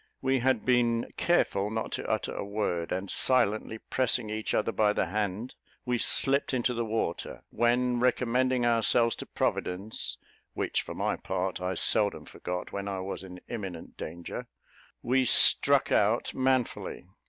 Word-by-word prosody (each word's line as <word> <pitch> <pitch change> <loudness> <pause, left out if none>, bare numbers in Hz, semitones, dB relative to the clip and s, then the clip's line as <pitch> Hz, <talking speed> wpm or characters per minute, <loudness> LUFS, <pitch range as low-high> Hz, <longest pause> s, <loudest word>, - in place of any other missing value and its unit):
We 135 0 +1
had 130 -2 +1
been 120 -2 +2
careful 105 - +1
not 110 0 -3
to - - -4
utter - - -1
a - - -4
word; 100 -5 -2
and, 95 +1 -1
silently 110 -3 +2
pressing 120 -2 0
each 110 0 -2
other 110 - +1
by 105 -2 +2
the - - +1
hand, 105 +3 -3 0.3
we 125 -1 0
slipped 135 +2 +1
into 125 0 +1
the 120 0 -1
water; 110 -6 -3
when, 120 +1 +2
recommending 125 0 +2
ourselves 115 0 +3
to - - -7
Providence, 95 +5 -2 0.4
which, - - 0
for - - -8
my - - -1
part, 95 -1 -3
I 90 +1 -1
seldom 105 +4 +1
forgot 90 0 -5
when 100 0 -4
I 95 -1 -3
was 95 +1 -4
in 90 -1 -10
imminent 95 -8 -6
danger, 85 +2 -7 0.6
we 130 +2 +3
struck 125 - +5
out - - +2
manfully. 130 -2 -1
110 Hz, 155 wpm, -29 LUFS, 100-125 Hz, 0.6 s, struck